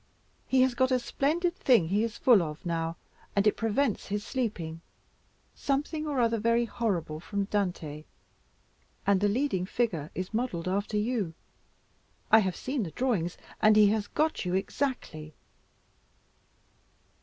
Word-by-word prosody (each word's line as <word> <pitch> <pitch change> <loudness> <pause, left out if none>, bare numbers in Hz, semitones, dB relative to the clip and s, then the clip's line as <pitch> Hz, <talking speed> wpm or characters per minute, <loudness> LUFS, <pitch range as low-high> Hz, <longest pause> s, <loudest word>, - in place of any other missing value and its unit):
He 260 -1 +4
has 260 -1 +2
got 260 +2 +2
a 255 - +3
splendid 330 +8 0
thing 230 - +3
he 205 +4 +2
is 230 -1 -3
full 235 -7 +5
of 155 +1 -6
now, 165 -1 -2 0.4
and 200 0 +3
it 210 - +4
prevents 225 +1 0
his 205 +1 -3
sleeping; 180 - -3 0.7
something 295 +3 -2
or 285 -3 -1
other 230 -1 +2
very 230 +2 +2
horrible 185 -10 -2
from 200 +4 -2
Dante, 175 -7 -2 1.0
and 195 -1 +3
the 205 - +4
leading 205 -5 0
figure 180 -11 -1
is 185 +3 -4
modelled 215 -8 -2
after 200 +3 -1
you. 210 -6 -1 1.0
I 220 - +9
have 190 -4 0
seen 265 0 -3
the 185 - -3
drawings, 195 -6 -1 0.2
and 215 0 +6
he 210 -1 +7
has 210 -1 0
got 310 +1 0
you 180 -1 -1
exactly." 190 - -3
210 Hz, 145 wpm, -29 LUFS, 180-250 Hz, 1.0 s, I